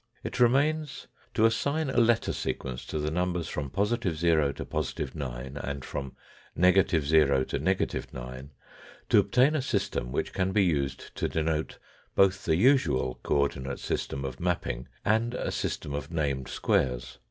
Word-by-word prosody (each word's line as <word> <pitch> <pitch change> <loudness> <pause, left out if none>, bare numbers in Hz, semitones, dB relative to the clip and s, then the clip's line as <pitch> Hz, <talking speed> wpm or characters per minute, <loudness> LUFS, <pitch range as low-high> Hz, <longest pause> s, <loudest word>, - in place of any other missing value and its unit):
It - - -5
remains 140 +3 +2 0.3
to 110 - +4
assign 140 +6 +1
a - - -3
letter 115 -1 +3
sequence 65 -2 -4
to - - -3
the 75 0 -1
numbers 90 -1 -1
from 70 -2 -4
positive 100 - 0
to 80 -4 +2
positive 75 -3 -3
9, 65 -1 -5
and 70 -1 -4
from 70 -2 -5 0.4
negative 90 -4 +4
to 70 -4 +3
negative - - -1
9, 65 +2 -8 0.6
to - - +6
obtain 130 +5 +3
a 150 - +1
system 60 - -1
which - - -2
can 95 0 0
be 100 - +4
used 70 -6 -2
to - - 0
denote 80 0 -1 0.4
both 95 -1 +3
the 80 - +3
usual 85 - +3
co 70 - +2
ordinate 65 0 -6
system 70 0 -3
of 65 -1 -5
mapping 85 -8 -2 0.2
and 115 +3 +2
a - - -2
system 70 - -3
of 70 - -4
named 70 -5 -1
squares. 60 -2 0
80 Hz, 155 wpm, -28 LUFS, 70-105 Hz, 0.6 s, to